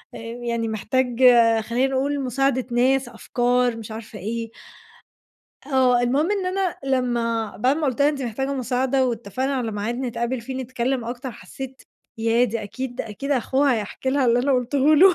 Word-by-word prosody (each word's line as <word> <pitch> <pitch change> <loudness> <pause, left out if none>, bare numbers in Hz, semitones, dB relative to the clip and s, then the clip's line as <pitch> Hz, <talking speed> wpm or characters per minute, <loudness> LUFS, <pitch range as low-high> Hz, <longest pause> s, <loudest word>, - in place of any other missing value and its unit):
آآ - - -6
يعني 235 0 -3
محتاج 240 +3 -1
آآ، 230 -3 +6
خلينا 240 +4 0
نقول 285 +2 0
مساعدة 260 0 0
ناس، 255 +1 +2
أفكار، 245 0 0
مش 225 -1 -8
عارفة 220 -1 -8
إيه. 225 +3 -4 1.2
آه، 255 -3 +3
المهم 275 +8 +1
إن 400 -3 0
أنا 370 -1 -1
لمّا 235 -5 0
بَعد 255 +7 +2
ما 315 -2 0
قُلت 260 0 -2
لها 285 - +6
أنتِ 290 -2 -2
محتاجة 265 +3 -2
مساعدة 260 +1 +1
واتّفقنا 240 +3 -2
على 240 -4 -2
ميعاد 210 +3 -2
نتقابل 245 0 -2
فيه 260 +3 -6
نتكلّم 255 0 -2
أكتر، 245 +3 -5
حسّيت 260 +6 -9 0.4
ياه! 230 +2 +3
دي 230 -1 -2
أكيد 245 +4 -6
دي - - -2
أكيد 275 +7 -6
أخوها 270 0 +2
هيحكِي 220 +4 -3
لها 275 0 +2
اللي 235 +1 +4
أنا 270 +3 +2
قُلتهوله 285 +8 +5
250 Hz, 170 wpm, -23 LUFS, 230-270 Hz, 1.2 s, آآ